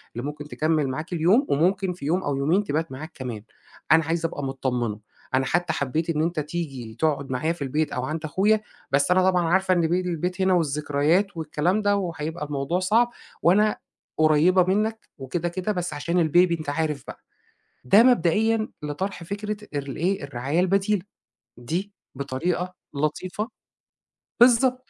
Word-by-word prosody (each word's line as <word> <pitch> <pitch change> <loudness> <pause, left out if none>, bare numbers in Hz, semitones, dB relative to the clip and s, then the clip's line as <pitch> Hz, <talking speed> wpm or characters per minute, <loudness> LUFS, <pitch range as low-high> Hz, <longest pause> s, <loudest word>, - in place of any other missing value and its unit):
اللي 120 +3 -4
ممكن 150 0 -7
تكمِّل 155 -1 0
معاك 155 +7 -4
اليوم 180 - +3
وممكن 180 +5 +1
في 170 -5 -9
يوم 180 +5 +1
أو 145 -1 -1
يومين 160 +9 +2
تبات 160 -3 -2
معاك 155 +6 -7
كمان، 120 -7 -6 0.5
أنا 160 -1 +6
عايزة 165 0 0
أبقى 145 - -6
متطمِّنة، 125 -5 -2 0.3
أنا 130 0 +2
حتى 175 +6 0
حبّيت 155 +5 -1
إن 155 -2 +1
أنت 165 0 0
تيجي 145 -7 -5
تقعُد 140 -3 0
معايا 155 +6 0
في 170 - -15
البيت 150 +3 -1
أو 125 - -2
عند 155 +4 -3
أخويا، 205 +7 +2 0.3
بس 140 +5 +2
أنا 185 +1 +5
طبعًا 180 -1 +2
عارفة 190 +2 +3
إن 170 -2 +2
بيل 180 +2 0
البيت 180 +3 -2
هنا 190 0 +3
والذكريات 155 +4 +1
والكلام 165 +5 0
ده 205 -1 +2
وهيبقى 165 -4 -3
الموضوع 145 +4 -1
صعب 225 +6 +3 0.3
وأنا 210 +5 +4 0.4
قريّبة 155 +4 +5
منّك 215 +4 -1
وكده، 160 +6 -3
كده 185 +4 -2
بس 175 -5 -3
عشان 165 +3 +1
الbaby 175 +1 +4
أنت 155 - -5
عارف 150 -1 -1
بقى. - - -8 0.7
ده 200 - +7
مبدئيًا 220 0 +3
لطرح 170 +5 -4
فكرة 210 +4 -4 0.2
ارل 140 -2 -4
إيه، 185 0 0
الرعاية 140 +4 -1
البديلة. 195 +1 +1 0.5
دي 170 +12 -4 0.2
بطريقة 160 +7 -2 0.2
لطيفة 180 +9 -2 0.9
بالضبط. 255 +1 +4
165 Hz, 160 wpm, -24 LUFS, 145-185 Hz, 0.9 s, ده